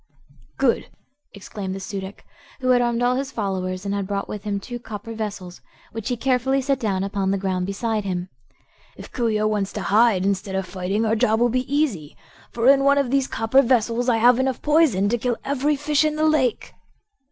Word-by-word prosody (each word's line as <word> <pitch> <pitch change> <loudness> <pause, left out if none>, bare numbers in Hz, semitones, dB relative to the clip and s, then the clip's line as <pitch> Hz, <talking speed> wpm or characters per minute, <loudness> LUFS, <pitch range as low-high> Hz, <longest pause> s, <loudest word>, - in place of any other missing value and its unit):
"Good!" 260 -3 +1 0.4
exclaimed 195 -1 -6
the - - -5
Su 195 +1 -5
dic, 190 +1 -9 0.3
who 255 -1 -1
had 250 -1 +5
armed 240 0 0
all 250 +1 +2
his 270 0 -3
followers 190 -3 -3
and 200 - -2
had 200 -1 -2
brought 200 0 -3
with 210 -1 -7
him 200 -1 -1
two 240 +4 -7
copper 225 0 -8
vessels, 205 -5 -6 0.3
which 225 0 -5
he 245 - -1
carefully 265 +2 +1
set 270 0 0
down 195 -5 -1
upon 195 -1 -1
the 195 - +1
ground 185 -1 -2
beside 215 +2 -2
him. 180 -2 -3 0.7
"If - - -11
Coo 235 -2 0
ee 215 -1 0
oh 215 - +1
wants 210 -2 0
to 210 - -4
hide 205 -1 +3
instead 195 0 -1
of 190 0 -1
fighting 190 +4 -2
our 220 0 +2
job 220 -1 +2
will 240 0 +3
be 255 +2 -2
easy, 250 - -1 0.3
for 235 +1 0
in 275 0 +6
one 280 0 +4
of 275 -3 +1
these 275 -1 +2
copper 225 +4 +3
vessels 245 -1 +1
I 230 - +3
have 240 +2 +5
enough 260 -1 -1
poison 295 - +3
to 240 +2 0
kill 240 0 -1
every 285 +2 +1
fish 290 +1 +1
in 305 0 0
the 310 0 +1
lake." 295 -6 +1
225 Hz, 215 wpm, -22 LUFS, 195-255 Hz, 0.7 s, in